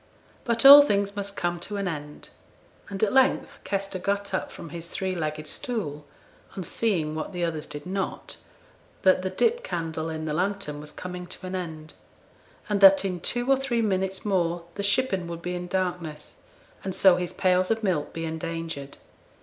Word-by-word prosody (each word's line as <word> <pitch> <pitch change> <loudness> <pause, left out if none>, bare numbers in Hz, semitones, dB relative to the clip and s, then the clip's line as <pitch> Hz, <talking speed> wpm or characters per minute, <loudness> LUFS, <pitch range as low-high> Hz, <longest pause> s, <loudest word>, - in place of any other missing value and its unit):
But 235 +1 +1
all 285 +1 +13
things 200 -6 +1
must 200 -1 -4
come 175 0 -1
to 205 +4 -3
an 200 -1 -1
end; 150 -3 -6 0.6
and 195 +1 -3
at 215 - +2
length 265 0 +2
Kester 195 -1 -3
got 200 +2 -2
up - - -2
from 165 - -9
his 170 0 -7
three 190 +2 -2
legged 155 -3 -3
stool, 150 - -4 0.5
on 190 - -3
seeing 170 -5 0
what 155 +5 -4
the 175 -1 -2
others 160 -2 -3
did 145 +1 -7
not 190 +1 -3 0.7
that 185 -1 +5
the 185 - -2
dip 465 - +1
candle 165 - -3
in 155 0 -4
the 155 - -2
lantern 185 -3 -2
was 150 0 -9
coming 180 +2 -7
to 185 - -8
an 185 - -5
end 160 -4 -5 0.7
and 205 -2 0
that 195 0 +8
in 180 -2 -2
two 240 +8 -1
or 270 0 +5
three 250 -4 0
minutes 190 -1 -1
more 175 -4 0
the 200 - -4
shippen 200 -3 +1
would 170 0 -7
be 180 - -3
in 180 0 -4
darkness, 175 -5 -3 0.5
and 190 -1 -4
so 185 -2 +6
his 180 -1 -2
pails 185 -1 +2
of 225 0 0
milk 170 -7 0
be 165 0 -4
endangered. 160 -3 -5
185 Hz, 185 wpm, -26 LUFS, 165-200 Hz, 0.7 s, all